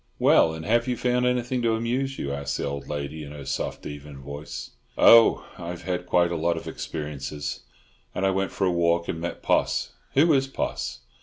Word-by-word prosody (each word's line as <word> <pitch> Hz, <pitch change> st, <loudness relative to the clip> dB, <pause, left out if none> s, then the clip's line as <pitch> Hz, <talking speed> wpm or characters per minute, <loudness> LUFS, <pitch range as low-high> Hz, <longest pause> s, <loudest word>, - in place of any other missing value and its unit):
"Well, 80 Hz, -, +5 dB
and 80 Hz, 0 st, -7 dB
have 120 Hz, +4 st, +2 dB
you 125 Hz, -1 st, 0 dB
found 125 Hz, +1 st, +1 dB
anything 125 Hz, 0 st, 0 dB
to 115 Hz, -1 st, +2 dB
amuse 130 Hz, +4 st, -1 dB
you?" 70 Hz, 0 st, -3 dB
asked 70 Hz, 0 st, -3 dB
the -, -, -2 dB
old 70 Hz, 0 st, -4 dB
lady 75 Hz, +1 st, -4 dB
in 75 Hz, 0 st, -9 dB
her 70 Hz, -2 st, -8 dB
soft, -, -, -3 dB
even 75 Hz, -1 st, -8 dB
voice. 70 Hz, +1 st, -7 dB, 0.3 s
"Oh, 115 Hz, -1 st, +7 dB
I've 90 Hz, 0 st, -6 dB
had 90 Hz, 0 st, -3 dB
quite 85 Hz, -1 st, +3 dB
a -, -, -1 dB
lot 85 Hz, +1 st, 0 dB
of -, -, -7 dB
experiences; 75 Hz, -2 st, -5 dB, 0.6 s
and 95 Hz, -, 0 dB
I 95 Hz, -, +3 dB
went 95 Hz, +1 st, -1 dB
for -, -, -1 dB
a 90 Hz, -, +3 dB
walk 85 Hz, 0 st, +2 dB
and 80 Hz, -, -3 dB
met 85 Hz, -, -5 dB
Poss. -, -, +1 dB, 0.2 s
Who 155 Hz, +4 st, +5 dB
is 135 Hz, -1 st, +2 dB
Poss?" -, -, -3 dB
85 Hz, 205 wpm, -25 LUFS, 75-115 Hz, 0.6 s, Oh